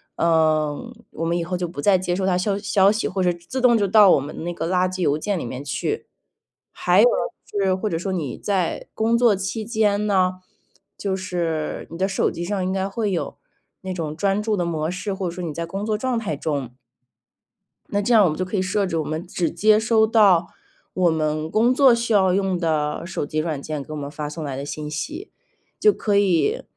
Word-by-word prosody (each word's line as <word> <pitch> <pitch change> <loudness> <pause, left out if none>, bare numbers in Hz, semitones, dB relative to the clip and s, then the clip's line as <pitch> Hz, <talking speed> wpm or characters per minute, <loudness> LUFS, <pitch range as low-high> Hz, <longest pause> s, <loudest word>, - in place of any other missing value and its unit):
嗯， 160 +6 +1 0.2
我 165 - -4
们 170 +1 0
以 170 - -1
后 180 +2 -3
就 175 -1 -2
不 155 -4 -7
再 195 +2 +4
接 180 -1 -2
收 190 +1 -1
它 185 -1 +2
消 195 +2 0
息 200 - -9
消 195 -1 +4
息， 215 +2 0
或 190 0 -2
者 180 -1 +2
自 175 +10 -6
动 245 -2 +5
就 205 - +1
到 205 -1 +7
我 - - +4
们 150 +3 -7
那 175 - -3
个 165 - -3
垃 185 0 +2
圾 185 0 -5
邮 150 -3 +2
件 200 +4 -2
里 - - -4
面 125 +3 -6
去。 150 - -3 0.6
还 - - +3
有， - - +7 0.4
就 205 - -4
是 190 -1 +2
或 210 +3 -2
者 165 - -1
说 190 +1 -3
你 155 -9 -3
在 190 -5 -2
工 230 +1 +1
作 235 -4 +4
期 195 +3 -4
间 210 -2 +1
呢， 185 -2 +2 0.6
就 200 -2 -2
是， 170 -4 -3
你 165 - -7
的 190 +2 +1
手 195 - 0
机 170 - -5
上 195 0 -2
应 185 - -1
该 190 0 -1
会 210 0 -2
有 175 - -3 0.4
那 190 -1 -4
种 155 -4 -4
专 195 +4 0
注 215 -2 0
的 175 - 0
模 160 -1 -2
式， 190 +2 -4
或 190 -2 -3
者 - - -5
说 185 - -5
你 160 - -4
在 170 +2 -4
工 195 +5 -5
作 215 -1 0
状 250 +1 -1
态 200 -9 -3
中。 140 -4 -3 1.2
那 205 - 0
这 235 +4 +1
样 215 -3 +7
我 175 - +4
们 155 - -3
就 185 - -1
可 185 +3 -5
以 185 - +2
设 195 +2 0
置， 165 -3 -2
我 160 - 0
们 155 +3 -4
只 175 -2 -1
接 215 +5 +4
收 220 0 +3
到 200 -6 +4 0.5
我 180 -3 +2
们 155 0 -1
工 235 +6 +3
作 265 -2 +6
需 235 -1 0
要 190 -3 +4
用 190 -1 +1
的 155 -1 -1
手 185 -4 -3
机 155 +1 -3
软 155 -3 -2
件， 150 -1 -4
给 155 - -12
我 - - -5
们 140 -1 -5
发 150 0 -5
送 155 +1 -6
来 140 -3 -4
的 140 - -5
信 150 +1 -5
息。 310 - -5 0.5
就 425 - +5
可 205 -2 0
以 200 - +2
185 Hz, 255 characters per minute, -22 LUFS, 160-205 Hz, 1.2 s, 到